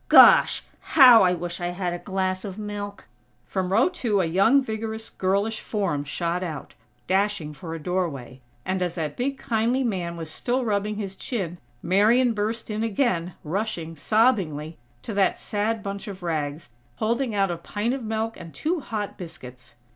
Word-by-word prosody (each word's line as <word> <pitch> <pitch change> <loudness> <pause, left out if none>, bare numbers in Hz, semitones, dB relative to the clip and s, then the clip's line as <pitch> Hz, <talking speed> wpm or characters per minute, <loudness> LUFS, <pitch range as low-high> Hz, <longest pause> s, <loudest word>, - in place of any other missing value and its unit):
Gosh!! - - +8 0.3
How 250 -5 +10
I 180 -1 +4
wish 175 +1 -5
I 175 - -1
had 175 0 -2
a 175 - -4
glass 190 -1 -2
of 195 -2 -6
milk!" 205 -1 -6 0.4
From 185 +3 -2
row 225 - +5
two 240 - 0
a 185 - +2
young, 195 +11 +4
vigorous 220 -1 -5
girlish 200 +4 0
form 185 -10 -2
shot 170 +4 -2
out, 160 -5 -5 0.3
dashing 190 -5 0
for 165 +3 -7
a - - -6
doorway; 150 -8 -3 0.2
and 185 0 -1
as 175 -2 -1
that 155 -4 -3
big 270 +2 -2
kindly 240 +1 0
man 180 -7 -2
was 160 -2 -5
still 250 +8 -1
rubbing 210 -1 0
his 195 -2 -5
chin, 185 -7 -4 0.2
Marian 225 +7 +4
burst 220 +1 -2
in 210 +1 -2
again, 195 - 0
rushing, 170 -1 -3
sobbingly, 165 - +1 0.2
to 220 - -5
that 195 -1 +2
sad 215 +1 -2
bunch 200 +2 -5
of 190 -3 -8
rags, 155 -2 -3 0.3
holding 235 +1 0
out 195 -2 +2
a 170 - -3
pint 210 +7 -2
of 270 - -3
milk 220 +1 -2
and 170 -2 -10
two 335 +3 -1
hot 215 -7 -5
biscuits. 130 -8 -10
195 Hz, 170 wpm, -25 LUFS, 170-220 Hz, 0.4 s, How